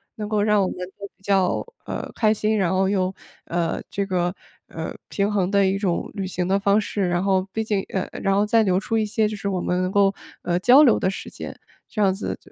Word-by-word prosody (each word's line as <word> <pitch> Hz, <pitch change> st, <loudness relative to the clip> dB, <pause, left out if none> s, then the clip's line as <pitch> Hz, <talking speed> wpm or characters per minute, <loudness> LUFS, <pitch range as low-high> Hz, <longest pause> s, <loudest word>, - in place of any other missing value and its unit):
能 210 Hz, -1 st, -5 dB
够 215 Hz, -1 st, +1 dB
让 210 Hz, -1 st, +3 dB
我 190 Hz, -, +2 dB
们 -, -, -5 dB, 0.2 s
都 200 Hz, -, -6 dB
比 -, -, -32 dB
较， 195 Hz, -2 st, +1 dB, 0.2 s
呃， -, -, -5 dB
开 215 Hz, -1 st, +2 dB
心， 215 Hz, 0 st, 0 dB
然 190 Hz, -4 st, +2 dB
后 190 Hz, 0 st, +2 dB
又， 190 Hz, -2 st, 0 dB, 0.3 s
呃， 170 Hz, -1 st, -1 dB
这 200 Hz, 0 st, -2 dB
个 180 Hz, -1 st, -1 dB, 0.3 s
呃， -, -, -5 dB, 0.2 s
平 200 Hz, +1 st, 0 dB
衡 190 Hz, -3 st, +1 dB
的 200 Hz, -1 st, +3 dB
一 190 Hz, +1 st, +1 dB
种 185 Hz, -4 st, -1 dB
旅 195 Hz, -2 st, -3 dB
行 180 Hz, -1 st, -2 dB
的 195 Hz, +1 st, +2 dB
方 200 Hz, +1 st, +3 dB
式。 200 Hz, -3 st, -1 dB
然 175 Hz, +1 st, 0 dB
后 190 Hz, -1 st, +1 dB
毕 220 Hz, -, -2 dB
竟 210 Hz, -3 st, 0 dB
呃， 190 Hz, -1 st, -2 dB
然 195 Hz, 0 st, +2 dB
后 205 Hz, +1 st, +3 dB
再 225 Hz, +2 st, +4 dB
留 185 Hz, -3 st, +2 dB
出 220 Hz, +3 st, -3 dB
一 220 Hz, -, +2 dB
些 215 Hz, +1 st, +1 dB
就 215 Hz, -, -4 dB
是 200 Hz, -1 st, -3 dB
我 185 Hz, -, -1 dB
们 180 Hz, +1 st, 0 dB
能 185 Hz, -, 0 dB
够， 200 Hz, 0 st, +4 dB, 0.3 s
呃， 175 Hz, 0 st, 0 dB
交 250 Hz, +9 st, +7 dB
流 250 Hz, -7 st, +5 dB
的 190 Hz, -, +1 dB
时 195 Hz, -, -6 dB
间， -, -, -8 dB, 0.3 s
这 215 Hz, -, -7 dB
样 195 Hz, -2 st, +4 dB
子 195 Hz, -, -4 dB
就 -, -, -21 dB
195 Hz, 270 characters per minute, -23 LUFS, 185-210 Hz, 0.3 s, 交